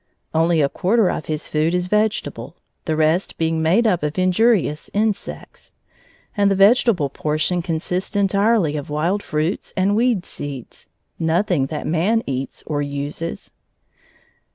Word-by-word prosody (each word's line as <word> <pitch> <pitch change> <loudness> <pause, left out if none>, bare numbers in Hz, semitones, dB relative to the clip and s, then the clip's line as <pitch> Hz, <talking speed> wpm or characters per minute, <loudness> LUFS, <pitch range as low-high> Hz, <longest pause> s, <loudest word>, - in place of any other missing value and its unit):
Only 165 -1 +3
a - - +3
quarter 195 +6 +1
of - - -5
his 155 0 -3
food 160 +3 0
is 180 0 0
vegetable, 210 +3 -1 0.3
the 160 - 0
rest 160 +4 +1
being 160 0 0
made 180 +9 +3
up 185 -6 +2
of 150 +2 -3
injurious 185 -3 +2
insects; 215 0 -3 0.6
and 200 -2 +3
the 195 - +2
vegetable 200 - +4
portion 155 +5 -1
consists 180 +4 -3
entirely 200 -4 +2
of 145 - -6
wild 170 +7 0
fruits 155 +1 -3
and 195 +2 +2
weed 230 -5 +1
seeds, 140 -4 -8 0.3
nothing 165 -3 +1
that 150 +1 -5
man 190 +8 +1
eats 135 0 -4
or 145 -1 -2
uses. 145 +3 -5
175 Hz, 140 wpm, -21 LUFS, 155-200 Hz, 0.6 s, vegetable